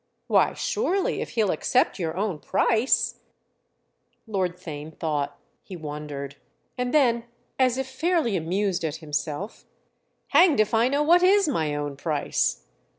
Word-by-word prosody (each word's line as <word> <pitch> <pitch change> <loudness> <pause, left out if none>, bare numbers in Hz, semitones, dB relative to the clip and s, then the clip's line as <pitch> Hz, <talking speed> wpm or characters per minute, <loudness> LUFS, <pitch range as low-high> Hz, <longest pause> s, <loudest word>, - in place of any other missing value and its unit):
"Why - - +3
surely 420 -6 0
if - - -4
he'll 220 -5 +2
accept 255 -4 +1
your 165 -1 -3
own 195 -6 -1
price—!" 230 - +1 1.1
Lord 190 -5 -2
Theign 155 -3 -8
thought—he 155 +4 -5
wondered; 145 -3 -6 0.4
and 250 -1 -2
then 235 -6 +3 0.3
as 255 -1 +3
if 265 - -1
fairly 270 - 0
amused 185 +2 -1
at 155 -2 -2
himself: 155 +4 -4 0.7
"Hanged 335 -9 +5
if 215 +1 +2
I 225 +2 +4
know 285 +3 +1
what 345 +4 +5
is 390 +1 +5
my 160 - 0
own 145 -1 -4
price!" 140 - -1
195 Hz, 135 wpm, -25 LUFS, -, 1.1 s, Hanged